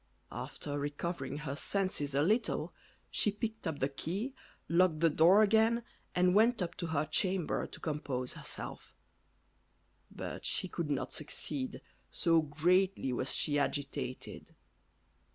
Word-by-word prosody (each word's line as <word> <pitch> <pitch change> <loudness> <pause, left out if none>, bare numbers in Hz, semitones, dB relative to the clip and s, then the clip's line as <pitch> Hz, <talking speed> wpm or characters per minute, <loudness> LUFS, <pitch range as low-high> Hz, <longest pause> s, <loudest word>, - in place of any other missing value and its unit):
After 145 0 -5
recovering 145 -1 -3
her 145 -2 -4
senses 155 -5 0
a 145 - +3
little, 220 +8 +1 0.4
she - - +3
picked 220 -1 -4
up 160 -3 -2
the 135 - +1
key, 190 - -4 0.3
locked 170 -2 +3
the 165 -1 +4
door 180 +8 +6
again, 225 +2 +3 0.3
and 180 0 +4
went 225 +4 +4
up 175 -2 -2
to 170 - -3
her 155 -2 0
chamber 180 +2 +1
to - - -9
compose 140 -5 -2
herself; - - -7 1.1
but - - -6
she - - 0
could 170 -4 -3
not 130 -3 -2
succeed, 145 -3 -3 0.3
so 165 -1 +3
greatly 160 0 +2
was 130 +2 +1
she 145 -2 +2
agitated. 140 -3 -3
160 Hz, 135 wpm, -33 LUFS, 145-190 Hz, 1.1 s, door